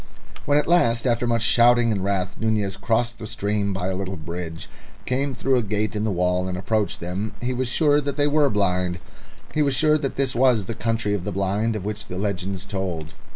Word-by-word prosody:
When 145 - +4
at 150 - +3
last, 120 -10 +3
after 120 -1 +1
much 115 -1 +1
shouting 120 +1 +5
and 100 -3 -1
wrath, 95 -1 -1
Nunez 105 -3 0
crossed 120 +2 -1
the 110 - -6
stream 105 -2 -1
by 95 -1 -2
a 95 - -2
little 95 0 -4
bridge, 85 0 -6 0.4
came 135 +1 -1
through 130 +2 +1
a - - +2
gate 105 0 -2
in 105 +1 -1
the - - +1
wall, 90 0 +1
and 90 -1 -3
approached 105 +2 -1
them, 95 +5 -4
he 125 +1 -2
was 125 0 -1
sure 145 +3 +3
that 140 0 -3
they 145 - +3
were 145 -1 +3
blind. 90 -4 0 0.6
He 155 - +1
was 140 -2 +2
sure 155 +3 +3
that 135 -2 -3
this 135 -1 0
was 120 -5 +3
the 115 - -4
Country 115 -2 -1
of 100 -4 -2
the 105 - -3
Blind 100 +4 0
of 100 -3 -4
which 105 -1 -5
the 90 - -6
legends 95 -1 -3
told. 90 -6 -4
110 Hz, 220 wpm, -23 LUFS, 95-120 Hz, 0.6 s, shouting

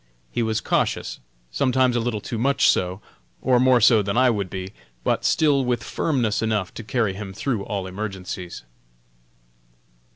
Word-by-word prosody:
He - - -1
was 110 -1 0
cautious - - -1 0.3
sometimes 130 - +2
a - - +2
little 115 -2 -2
too 115 - -4
much 140 +4 +3
so, 90 +2 +1 0.4
or 125 -1 +3
more 130 -1 +5
so 115 -1 +6
than 100 +3 -2
I 130 -1 +5
would 100 -4 -2
be, 95 +1 -6 0.3
but - - 0
still 145 -4 +3
with 120 -3 -1
firmness 125 -9 0
enough 110 -4 -1
to 115 - -7
carry 110 -3 0
him 95 0 -7
through 110 0 -2
all 100 -2 -3
emergencies. 95 -2 -6
110 Hz, 160 wpm, -23 LUFS, 100-125 Hz, 0.4 s, so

